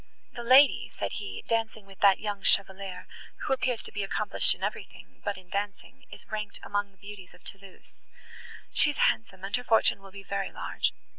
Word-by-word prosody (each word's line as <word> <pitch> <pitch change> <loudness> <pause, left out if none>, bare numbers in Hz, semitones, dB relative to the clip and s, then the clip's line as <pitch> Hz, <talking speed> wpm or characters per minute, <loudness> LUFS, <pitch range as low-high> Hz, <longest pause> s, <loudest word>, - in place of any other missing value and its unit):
"The 240 - -6
lady," 260 +4 +6
said - - -2
he, 455 - -6
"dancing 225 -2 -1
with 195 -1 -16
that 195 -2 +6
young 205 -2 -4
Chevalier, 190 -1 +2 0.4
who - - +2
appears 250 -3 -1
to - - -3
be 205 - -3
accomplished 195 - +2
in - - -12
everything, 90 0 -6
but 200 - -2
in 185 -1 -14
dancing, 200 +1 -5
is - - -12
ranked 210 -1 -4
among 205 0 -1
the 195 - -30
beauties 200 -2 -11
of 180 - -21
Thoulouse. 195 +1 -11 0.7
She 295 - +6
is 295 - -4
handsome, 195 -4 +1
and 195 +1 0
her 245 - -2
fortune 225 -3 +3
will 195 - -12
be 195 0 -10
very 195 0 -3
large. - - -1
200 Hz, 195 wpm, -28 LUFS, 195-225 Hz, 0.7 s, lady